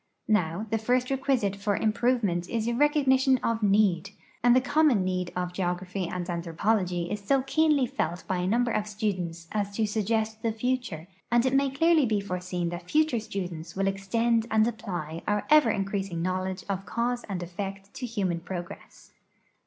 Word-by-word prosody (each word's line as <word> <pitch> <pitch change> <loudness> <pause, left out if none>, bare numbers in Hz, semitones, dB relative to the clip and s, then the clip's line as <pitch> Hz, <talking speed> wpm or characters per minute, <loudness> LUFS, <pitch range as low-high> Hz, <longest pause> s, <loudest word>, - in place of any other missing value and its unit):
Now, 195 -2 +1
the 225 - +1
first 250 +3 +1
requisite 260 -7 +1
for 200 0 -1
improvement 215 -6 +1
is 230 0 -1
recognition 265 -1 +3
of 230 -1 0
need, 200 -3 +3 0.3
and 245 0 +6
the - - +7
common 270 -7 +3
need 180 -1 -2
of 180 0 -2
geography 180 0 -2
and 175 0 -4
anthropology 175 +1 -1
is 210 -1 -4
so 265 +6 +2
keenly 300 -1 +3
felt 205 -9 -3
by 185 - 0
a 180 0 -1
number 235 +4 +2
of 215 -1 -1
students 185 -6 -3
as 205 -1 -2
to 220 - +1
sug 210 -1 -2
gest 220 -1 0
the 230 -1 0
future, 235 -8 -2 0.2
and 240 +1 +4
it 260 - +1
may 275 0 +3
clearly 310 +1 +3
be 215 -2 +1
foreseen 180 -2 -3
that 175 +1 -7
future 305 -6 +2
students 180 -6 -6
will 195 0 0
extend 225 +4 +1
and 220 0 +3
apply 175 -9 -4
our 210 -1 0
ever 305 -6 +7
increasing 195 -4 -2
knowledge 185 +1 -2
of 195 -1 -3
cause 240 +1 -1
and 180 -3 -3
effect 195 +2 -6
to 265 -2 -5
Imman 190 -7 -2
progress. 175 -1 -8
205 Hz, 175 wpm, -27 LUFS, 180-240 Hz, 0.3 s, the